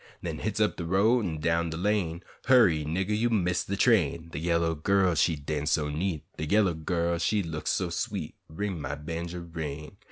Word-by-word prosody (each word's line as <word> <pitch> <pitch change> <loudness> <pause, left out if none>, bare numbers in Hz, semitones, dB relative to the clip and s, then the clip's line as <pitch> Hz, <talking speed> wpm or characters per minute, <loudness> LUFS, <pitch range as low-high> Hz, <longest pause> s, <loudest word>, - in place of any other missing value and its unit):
Den - - -4
hits - - -2
up - - +2
de - - -3
road 105 +8 +3
an' 80 -5 -3
down 85 +2 +1
de 80 - -4
lane, 90 -3 0 0.2
Hurry, 110 -12 +5
niggah, 95 +7 -1
you 115 +3 +1
miss 90 -6 +1
de 100 - -3
train; 85 - +2
De 75 - -5
yaller 85 0 +1
gal 95 +3 +2
she 80 +1 +2
dawnce 75 0 -3
so 75 -1 +1
neat, 80 +1 -2
De 80 - -3
yaller 100 -1 +3
gal 85 +1 -1
she 100 +4 +1
look 80 -2 -5
so - - 0
sweet, - - -3 0.2
Ring, 95 0 -3
my 70 +1 -3
bawnjer, 85 +3 -5
ring! 75 +2 -6
85 Hz, 195 wpm, -28 LUFS, 80-95 Hz, 0.2 s, Hurry